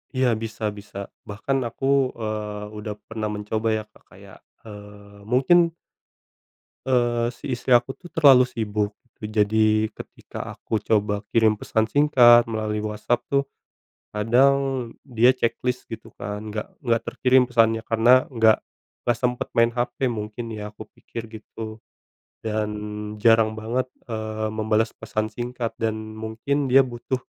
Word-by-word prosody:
Iya, 130 0 +3
bisa 115 0 -6
bisa. 100 -1 -9 0.2
Bahkan 120 +5 -2
aku, 135 +2 +1
eee, 105 -2 -4
udah 105 0 -5
pernah 110 -1 -3
mencoba 105 +1 -3
ya 110 - -2
Kak, - - -23
kayak, - - -15 0.2
eee, 105 -1 -12
mungkin 165 +8 +4 1.1
Eee, 120 -2 +1
si - - -12
istri 125 +1 +1
aku 125 +2 +3
tuh 175 - -13
terlalu 135 -5 +7
sibuk. 105 -3 -2 0.2
Je - - -7 0.2
jadi 110 +1 +3
ketika - - -8
aku 110 - -3
coba 105 -1 0
kirim 110 -2 +4
pesan 110 +1 0
singkat 120 -4 +6
melalui 110 -1 -2
WhatsApp 105 +3 -1
tuh, 140 0 +3 0.7
kadang, 130 +3 +2 0.2
dia 120 -1 +4
checklist 125 0 -1
gitu 115 -1 -9
kan, 105 +1 -5
enggak 105 0 -4 0.2
enggak 115 -3 +2
terkirim 130 0 +3
pesannya 115 -2 +2
karena 120 +3 +5
enggak 110 -2 +4 0.5
enggak 120 - +2
sempat 125 0 0
main 115 0 +4
HP 125 +2 -1
mungkin 110 +1 -5
ya, 105 -1 -6
aku - - -9
pikir 115 -1 -9
gitu, 110 0 -8 0.7
dan 110 -1 -1 0.5
jarang 115 -1 +5
banget, 115 +4 -2 0.2
eee, 110 0 -3
membalas 110 +1 +1
pesan 110 0 -4
singkat 120 0 -4
dan 110 -1 0 0.2
mungkin 115 +6 -2
dia 135 +1 +6
butuh 125 +1 -4
115 Hz, 140 wpm, -24 LUFS, 110-125 Hz, 1.1 s, terlalu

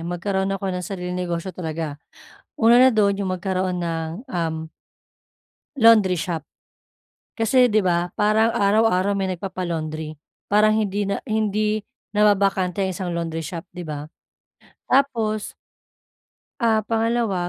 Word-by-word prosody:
magkaroon 190 +3 -2
ako 195 -1 -3
ng 180 0 -3
sariling 180 -1 -5
negosyo 180 0 -3
talaga. 160 -4 -5 0.5
Una 235 +1 +5
na 260 +1 +7
do'n 200 -2 +2
'yong 200 - -2
magkaroon 185 -1 -2
ng, 165 -1 -2 0.2
um 160 -3 -3 1.1
laundry 215 -5 +6
shop. 165 -4 -3 0.9
Kasi 250 +3 +4
'di 215 -2 +2
ba, 175 -1 0
parang 220 +2 +3
araw-araw 200 -1 +2
may 190 -1 -1
nagpapa-laundry 165 -4 -4 0.4
parang 215 +1 +5
hindi 205 -2 -1
na 200 - 0
hindi 215 0 0 0.3
nababakante 200 -2 +2
ang 190 - -1
isang 180 -1 -4
laundry 165 -1 -3
shop, 165 +3 -6
'di 180 - -7
ba? 145 -1 -5 0.8
Tapos 230 -6 +1 1.1
ah, 220 -2 +2
pangalawa, 225 -5 0
195 Hz, 125 wpm, -22 LUFS, 175-215 Hz, 1.1 s, na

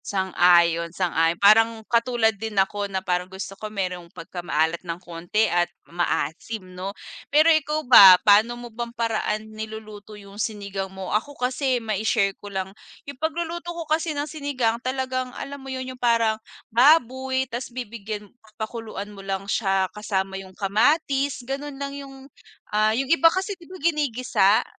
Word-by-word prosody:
Sang-ayon, 175 -3 +3
sang-ayon 165 -2 +1
parang 220 +2 +4
katulad 235 -1 +2
din 215 0 -6
ako 200 +1 +1
na 190 -1 -4
parang 180 0 -1
gusto 190 +1 -7
ko 215 +2 -7
merong 180 -4 -4
pagkamaalat 165 -1 -2
ng 170 -2 -5
konti 175 +4 -1
at 175 -4 +1 0.2
maasim 180 +4 -2
'no. 185 +2 -5 0.4
Pero 310 +3 +6
ikaw 310 0 0
ba 195 -7 +10
paano 215 +3 +5
mo 240 -1 -10
bang 235 +1 -4
paraan 220 -1 -2
niluluto 215 -1 -8
yung 200 +1 -8
sinigang 200 -3 -4
mo. 190 0 -6
Ako 280 +7 -1
kasi 255 +1 0
mai-share 215 -2 0
ko 205 - -8
lang, 190 -1 -4 0.3
yung 280 - -7
pagluluto 340 +2 -3
ko 340 -1 -5
kasi 315 0 -1
ng 290 - -1
sinigang 275 -7 -2
talagang 255 0 -2
alam 280 0 -7
mo 270 - -9
yun 260 0 -5
yung 250 - -17
parang 230 -2 +2 0.3
baboy 260 0 +4
tas 245 0 -6
bibigyan 220 -4 -6 0.3
pakuluan 220 -2 -5
mo 200 - -10
lang 195 0 -4
siya 195 -2 +1
kasama 195 -2 -2
yung 190 -1 -14
kamatis, 270 +5 +1
ganon 275 +2 -5
lang 280 0 -5
yung 270 -1 -10 0.5
ah, 215 +1 +3
yung 270 - 0
iba 330 +3 +5
kasi 380 +4 -2
di 350 -3 -15
ba 370 - -9
ginigisa? 255 - +2
220 Hz, 155 wpm, -24 LUFS, 195-265 Hz, 0.5 s, ba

